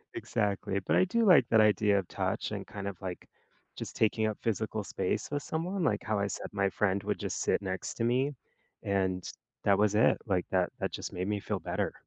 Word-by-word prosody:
Exactly, 100 -1 -1
but 95 - 0
I 185 - +5
do 230 +5 +1
like 165 - +7
that 110 -1 +6
idea 105 -1 +4
of 90 - -5
touch - - -2
and - - -4
kind 100 0 -6
of, 95 -3 -5
like, 90 -2 -6 0.5
just - - -6
taking 110 0 +2
up 110 - -2
physical 110 -1 -1
space 95 -1 -2
with 145 0 -2
someone, 175 +3 -2
like - - +1
how 110 -3 0
I 100 - +1
said 95 - -5
my 100 -1 +1
friend 100 0 +1
would 105 0 -2
just - - -3
sit - - +1
next 95 -1 -3
to 115 - -2
me 130 +4 +2 0.5
and 95 -2 0 0.4
that 100 -1 +4
was 105 0 +3
it, 110 - +5
like, 95 -5 0
that 90 -1 +2
that - - -1
just - - -5
made 90 +2 -2
me 105 -1 0
feel - - -3
better. - - -2
105 Hz, 220 wpm, -30 LUFS, 95-115 Hz, 0.5 s, like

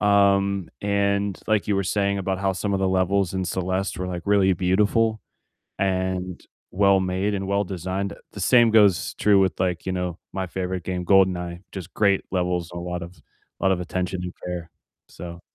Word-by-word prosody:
um, 100 -2 +3
and, 100 -1 0
like, 110 -2 +1
you 100 - +2
were 100 - +1
saying 100 +1 0
about 95 0 -2
how 95 -1 +1
some 100 +2 -2
of 95 - 0
the 95 - +2
levels 95 0 +1
in 95 - -1
Celeste 95 +2 -2
were, 90 - -3
like, 90 -1 -4
really 100 -2 +4
beautiful, 105 +5 +2 0.6
and 95 -1 -1 0.3
well 100 0 +4
made, 95 +3 -1
and 95 -1 -2
well 100 +1 +1
designed, 95 +2 -3
uh, - - -14 0.2
the 100 - -8
same 120 +3 +5
goes 105 -5 +4
true 100 -2 +4
with 95 -4 +1
like, 90 -3 -1
you 95 - -1
know, 90 -1 -3 0.2
my 95 -1 -2
favorite 90 0 -3
game, 90 -1 -3
GoldenEye, 90 -2 +2
just 95 -2 -8
great 100 -2 +2
levels 90 -2 -1
and 85 - -5
a - - -5
lot 90 0 -4
of 85 +2 -10 0.4
lot 95 -1 +3
of 90 - +1
attention 90 +1 -3
and 90 - -6
prayer, 90 -1 -6 0.4
so 85 -1 -9
95 Hz, 195 wpm, -24 LUFS, 90-100 Hz, 0.6 s, same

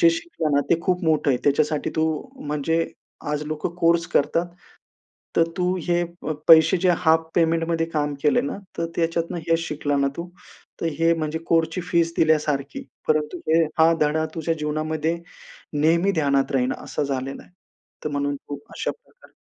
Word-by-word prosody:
जे 335 -2 +7
शिकलं 330 - -2
ना, 145 - +4
ते 170 - +3
खूप 180 0 0
मोठं 155 -2 +2
आहे. 125 - +2
त्याच्यासाठी 145 +1 +1
तू 160 - +3 0.4
म्हणजे 150 +3 0 0.4
आज 150 0 -1
लोकं 155 +2 -3
कोर्स 170 -1 +3
करतात. 165 +4 +1 0.9
तर 165 - +5
तू 180 0 +1
हे 175 0 +2 0.4
पैसे 160 +2 +7
जे 185 - +5
हाफ 160 -1 +3
पेमेंटमध्ये 165 0 +2
काम 150 -2 -1
केले 150 - +4
ना, 140 - -4 0.2
तर 165 - 0
त्याच्यातून 170 +1 -1
हेच 165 0 +3
शिकला 145 -1 -1
ना 140 - +2
तू. 170 +1 -5 0.5
तर - - -1
हे 165 0 +4
म्हणजे 160 -1 -2
कोर्सची 165 +1 +1
फीज 165 -1 +2
दिल्यासारखी. 150 - +1 0.2
परंतु 155 +2 +1
हे 165 +1 +4 0.2
हा 160 +1 +6
धडा 155 +1 +2
तुझ्या 165 0 0
जीवनामध्ये 155 +2 -1 0.6
नेहमी 165 +6 +3
ध्यानात 140 -5 +1
राहील 130 -1 +1
असं - - -3
झालेलं 135 -1 -3
आहे. - - -22 0.5
तर 150 - -2
म्हणून 145 0 -1
खूप 145 - -7
अशा - - -2
प्रकारे - - -21
160 Hz, 165 wpm, -23 LUFS, 150-170 Hz, 0.9 s, जे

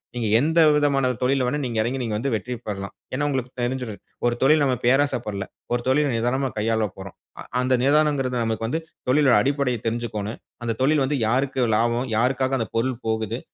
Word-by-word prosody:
நீங்க 120 -2 -1
எந்த 160 +5 +2 0.2
விதமான 140 -3 +2
தொழில்ல 130 0 +2
வேணா 145 +4 -1
நீங்க 115 -3 -2
இறங்கி 125 +4 -1
நீங்க 110 -3 -2
வந்து 135 +5 -2
வெற்றி 125 +4 -4
பெறலாம். 100 -1 -5 0.2
ஏன்னா 145 +3 0
உங்களுக்கு 130 -3 -2
தெரிஞ்சுரும். 120 -3 -3 0.3
ஒரு 120 0 0
தொழில் 150 +2 +5
நாம 130 -2 +2
பேராசை 135 +2 +3
படலை. 100 -2 -4 0.3
ஒரு 120 - 0
தொழில 140 +1 +2
நிதானமா 130 +3 0
கையாளப் 110 -2 0
போறோம். 95 -1 -9 0.2
அ - - -6 0.2
அந்த 130 +1 +1
நிதானம்கிறது 140 -2 +2
நமக்கு 115 0 -2
வந்து 160 +8 -2 0.3
தொழிலுடைய 140 -1 +5
அடிப்படையை 135 -2 0
தெரிஞ்சுக்கணும். 110 -2 -3 0.2
அந்த 115 -1 -1
தொழில் 145 +1 +3
வந்து 145 +2 -1
யாருக்கு 130 +2 +1
லாபம்? 120 +3 +1
யாருக்காக 130 +2 +1
அந்த 115 - -3
பொருள் 125 +2 0
போகுது? 110 +1 -1
125 Hz, 180 wpm, -23 LUFS, 115-135 Hz, 0.3 s, தொழில்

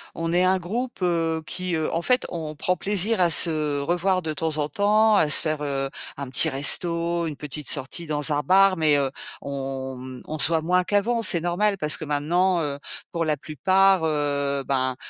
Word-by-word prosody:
on 165 0 -2
est 180 - +3
un 185 +1 +3
groupe, 230 +7 -5
heu, 165 -2 0
qui 180 0 -3
heu, 160 -1 -2
en 165 - 0
fait, 250 +7 +1
on 155 -3 -5
prend 180 +4 0
plaisir 205 +2 0
à 175 - +4
se 155 -3 +2
revoir 175 +5 0
de 155 -1 -3
temps 160 0 -2
en 150 -1 -1
temps, 215 +3 +3
à 160 -7 +3
se - - +6
faire, 155 -2 -2
heu, 135 -1 -2 0.3
un 140 -2 -6
petit 135 +5 +1
resto, 170 +4 +1
une 150 - -5
petite 150 0 -6
sortie 145 +5 -2
dans 150 0 -1
un 145 - +1
bar. 190 +5 +4
Mais, 155 -2 +3
heu, 135 -2 0 0.3
on, 135 -1 -5
mmh, 130 -1 -9
on 155 0 -6
se - - +4
voit 165 -1 +1
moins 180 +3 +2
qu'avant, 205 +5 0
c'est 180 -6 +2
normal 195 +4 0
parce 150 -4 -1
que 160 - -7
maintenant, 170 +5 +1
heu, 140 -1 -4 0.3
pour 170 -1 -1
la 155 -2 0
plupart, 190 +6 +2
heu, 140 -2 -1
ben, 130 -2 0
160 Hz, 205 wpm, -24 LUFS, 145-180 Hz, 0.3 s, se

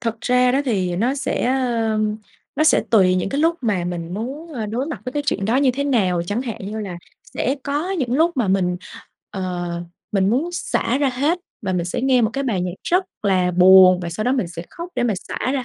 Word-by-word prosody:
Thật 230 -2 -3
ra 250 0 +3
đó 275 - +2
thì 185 -8 0
nó 240 +7 +1
sẽ, 280 - -2
ơ, 235 -4 0 0.6
nó 310 - +3
sẽ 315 - +5
tùy 190 -5 +5
những 185 +1 0
cái 280 - -1
lúc 335 +1 +2
mà 200 -7 0
mình 175 -1 -4
muốn, 280 - -6
ơ, 225 -5 -3
đối 245 +7 -2
mặt 320 - -5
với 255 - -5
cái 290 - -1
chuyện 195 -7 0
đó 230 +5 +2
như 270 -2 +4
thế 280 +3 -2
nào. 190 -11 +1
Chẳng 215 +7 -1
hạn 230 -5 -5
như 215 +1 -4
là 180 -4 -6 0.4
sẽ 265 - 0
có 295 +6 -2
những 265 -11 -1
lúc 325 +5 +3
mà 230 -7 +1
mình, 180 -2 +1 0.5
ờ, 180 -2 -3 0.4
mình 195 0 +2
muốn 280 +9 +1
xả 265 -6 -1
ra 285 -2 +2
hết 285 +7 0 0.2
và 190 -2 -1
mình 175 -2 0
sẽ 175 - -3
nghe 255 -2 +3
một 220 - +2
cái 275 0 -2
bài 205 -8 0
nhạc 180 -1 -2
rất 365 +2 +2 0.2
là 185 -3 +2
buồn 185 0 +7
và 170 - -4
sau 215 +7 -3
đó 250 - +2
mình 245 -10 0
sẽ 170 0 -7
khóc 340 +1 -7
để - - 0
mà 230 -4 +1
xả - - -4
ra 265 -3 -1
230 Hz, 240 wpm, -21 LUFS, 185-270 Hz, 0.6 s, buồn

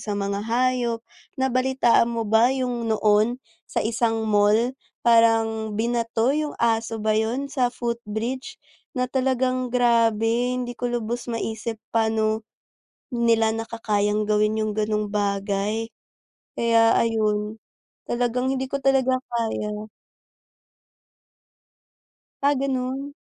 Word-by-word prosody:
sa 205 -2 -3
mga 200 0 -2
hayop. 235 +1 0 0.3
Nabalitaan 260 -2 +2
mo 230 -1 -2
ba 220 +3 +4
yung 250 -3 -2
noon? 215 +2 +3 0.3
Sa - - -1
isang 225 0 0
mall 215 +3 +3 0.3
parang 225 -2 +3
binato 230 +2 0
yung 300 0 -2
aso 225 -1 0
ba 215 0 0
yun? 235 +6 -1
Sa 250 -3 +2
footbridge 235 - -4 0.4
na 250 - +1
talagang 255 0 0
grabe 235 0 +2
hindi 245 -1 -3
ko 245 0 -3
lubos 240 +1 -4
maisip 225 0 -3 0.2
paano 220 -1 +1 0.7
nila 230 -2 +2
nakakayang 215 -2 -1
gawin 215 +1 +1
yung 215 - -1
ganung 210 0 -1
bagay. 205 +2 -1 0.7
Kaya 230 -1 +4
ayun 215 -1 0 0.5
talagang 245 +2 0
hindi 265 0 -1
ko 275 +1 -4
talaga 265 -1 +3 0.2
kaya. 215 -2 -2 2.6
Ah, 285 +1 +4
ganun? 270 +1 -2
230 Hz, 110 wpm, -24 LUFS, 220-250 Hz, 2.6 s, ba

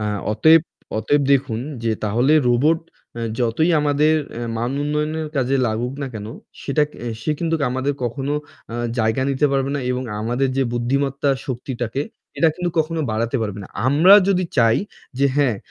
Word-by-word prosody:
আ - - -2 0.3
অতএব, 160 +8 +6 0.4
অতএব 145 +5 +2
দেখুন, 130 -5 +1 0.2
যে 115 - +2
তাহলে 120 +8 +2 0.2
রোবট 145 +7 +3 0.4
আ - - -4 0.2
যতই 120 +8 +1
আমাদের 150 +1 +3 0.3
আ - - -5 0.2
মান 120 +2 -1
উন্নয়নের 150 +2 -1
কাজে 135 0 +1
লাগুক 115 +3 -2
না - - -2
কেন, 105 -1 -6 0.4
সেটা 140 +2 +1 0.4
সে - - -1
কিন্তু 165 -1 0 0.2
আমাদের 130 +2 -1
কখনো 135 +4 -2 0.4
আ - - -5 0.2
জায়গা 110 +3 +1
নিতে 140 +2 +2
পারবে 135 0 0
না - - -2
এবং 125 +1 -1 0.2
আমাদের 120 +5 0
যে 135 - +3
বুদ্ধিমত্তা 135 +3 0 0.2
শক্তিটাকে 125 0 -3 0.4
এটা 165 - +5
কিন্তু 180 -1 -2
কখনো 160 +1 0
বাড়াতে 115 +4 -1
পারবে 105 -2 -4
না। - - -12 0.2
আমরা 160 +8 +7
যদি 185 -2 +2
চাই 115 -3 +4 0.4
যে 140 - +4
হ্যাঁ, 135 -7 +2
135 Hz, 165 wpm, -21 LUFS, 120-150 Hz, 0.4 s, আমরা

